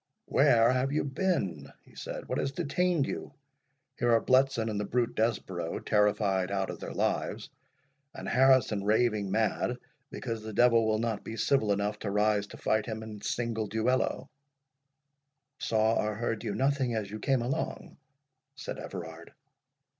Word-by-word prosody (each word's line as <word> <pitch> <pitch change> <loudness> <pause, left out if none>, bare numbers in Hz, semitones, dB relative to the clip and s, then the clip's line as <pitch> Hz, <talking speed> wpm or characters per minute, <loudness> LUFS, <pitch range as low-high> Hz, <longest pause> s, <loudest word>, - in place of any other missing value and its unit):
"Where 115 +1 +4
have 130 +1 0
you 150 - +1
been?" 135 - -1
he - - -20
said—"What - - -4
has 135 - -1
detained 175 0 0
you?—Here 120 - -6
are 115 - +5
Bletson 130 -3 +3
and 105 -2 -2
the - - -1
brute 120 +3 0
Desborough 95 -7 -1
terrified 105 -3 +1
out 95 -1 -1
of - - -9
their - - -6
lives, - - -2 0.6
and - - -7
Harrison 130 -5 +4
raving 105 -1 +2
mad, 110 +4 0 0.3
because 115 -3 -5
the 110 0 -7
devil 115 -1 +4
will 110 0 +2
not 115 -2 -2
be 115 - -6
civil 110 -2 +2
enough 100 +1 -1
to 105 - -3
rise 105 0 +2
to - - -11
fight 110 +1 0
him 110 -1 -4
in 105 -2 -9
single 115 -3 -2
duello." 125 +5 0 1.3
"Saw 110 0 +2
or 105 0 -2
heard 115 0 -2
you 105 -3 -3
nothing 135 -3 +1
as 105 -3 -3
you 110 - -5
came 130 +2 +1
along?" 125 +3 -4 0.6
said - - -6
Everard. - - -8
110 Hz, 155 wpm, -29 LUFS, 105-125 Hz, 1.3 s, are